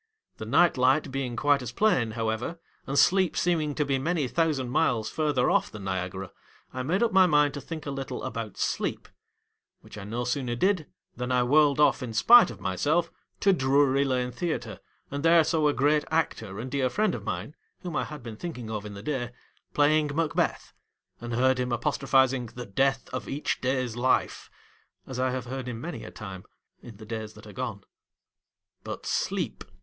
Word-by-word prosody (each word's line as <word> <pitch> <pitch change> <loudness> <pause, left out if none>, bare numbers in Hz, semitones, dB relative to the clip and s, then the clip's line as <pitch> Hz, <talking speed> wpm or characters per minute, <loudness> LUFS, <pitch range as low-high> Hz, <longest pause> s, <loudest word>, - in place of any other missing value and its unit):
The - - -7
night 175 -6 +4
light 130 +3 +3
being 130 -3 -3
quite 145 +3 +2
as 125 -2 -5
plain, 125 - +2
however, 115 +9 -2 0.3
and 140 - -2
sleep 185 +1 +4
seeming 155 -5 +1
to 150 - 0
be 135 -1 0
many 155 -1 0
th 145 - -5
ousand 145 -7 +1
miles 115 -3 +1
f - - -18
u - - +2
rther 135 -5 +2
off - - +2
than 105 -2 -9
Niagara, 95 0 -4 0.4
I 130 - -3
made 175 - +1
up 225 -3 +1
my 190 -1 +6
mind 150 -3 +3
to 145 - -6
think 160 0 -7
a 140 - -3
little 135 -1 -5
about 115 -5 -5
Sleep; - - -2 0.7
which 105 - -11
I - - -7
no 115 +4 -3
sooner 125 -1 -2
did 185 +2 +1 0.3
than 125 +1 -3
I 125 -1 +3
whirled 145 +2 +4
off 150 -1 +4
in 115 -3 -5
spite 240 - +7
of - - -9
myself 150 - 0 0.3
to 195 - +5
Drury 140 -2 +3
Lane 125 -2 0
Theatre, 160 +6 -4 0.3
and 140 +1 -3
there 165 +1 +6
saw 155 -1 +1
a - - +4
great 145 +2 +2
actor 115 -11 -1
and 125 +3 -6
dear 135 -2 +1
friend 210 - +1
of - - -5
mine 145 - -4 0.3
(whom 175 -4 -5
I - - 0
had 150 -4 -9
been 115 -2 -8
thinking 125 -9 -6
of 105 -1 -4
in 100 - -9
the 100 - -9
day) 130 -4 -2 0.5
playing 150 +1 +3
Macbeth, 160 -2 -1 0.5
and 120 0 -4
heard 130 +1 +3
him 125 0 -1
apostrophising 130 0 +2
" - - -28
the 125 0 -6
death 135 +5 0
of 130 - -4
each 145 +2 -2
day's 125 -3 -1
life," 125 +2 0 0.6
as 130 -1 -6
I 130 0 +2
have 125 -1 -3
heard 130 +1 -5
him 120 -2 -5
many 170 +8 -6
a - - -8
time, 95 -4 -9 0.4
in 115 -4 -12
the 110 - -11
days 110 -1 -5
that 110 - -14
are 105 - -11
gone. 120 -6 -5 1.0
But, - - -7
Sleep. - - -2
130 Hz, 200 wpm, -27 LUFS, 120-150 Hz, 1.0 s, spite